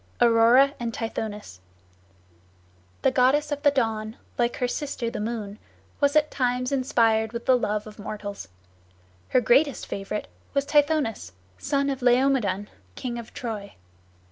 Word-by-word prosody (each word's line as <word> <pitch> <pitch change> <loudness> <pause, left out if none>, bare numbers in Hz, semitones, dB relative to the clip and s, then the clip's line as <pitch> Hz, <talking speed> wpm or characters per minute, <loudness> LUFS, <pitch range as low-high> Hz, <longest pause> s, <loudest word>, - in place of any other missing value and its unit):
AURORA 240 +4 +5
AND 235 -1 -3
TITHONUS 210 - -5 1.4
The 265 - +4
goddess 275 +4 +3
of 290 0 -2
the 290 - +5
Dawn, 225 -5 -1 0.2
like 240 0 0
her 250 - 0
sister 250 -3 -3
the - - -5
Moon, 215 -1 -4 0.4
was 285 0 +2
at 305 0 +3
times 250 0 0
inspired 230 -4 +2
with 235 0 -5
the 260 - +5
love 210 -3 -1
of 215 0 -12
mortals. 205 - -6 0.8
Her 255 - +3
greatest 270 +4 +3
favorite 200 +1 -4 0.3
was 280 0 +2
Tithonus, 290 - +1 0.3
son 280 -1 0
of 270 -1 -5
Laomedon, 245 -6 +2 0.3
king 240 -1 -4
of 235 - -10
Troy. 215 -4 -6
240 Hz, 140 wpm, -25 LUFS, 220-275 Hz, 1.4 s, AURORA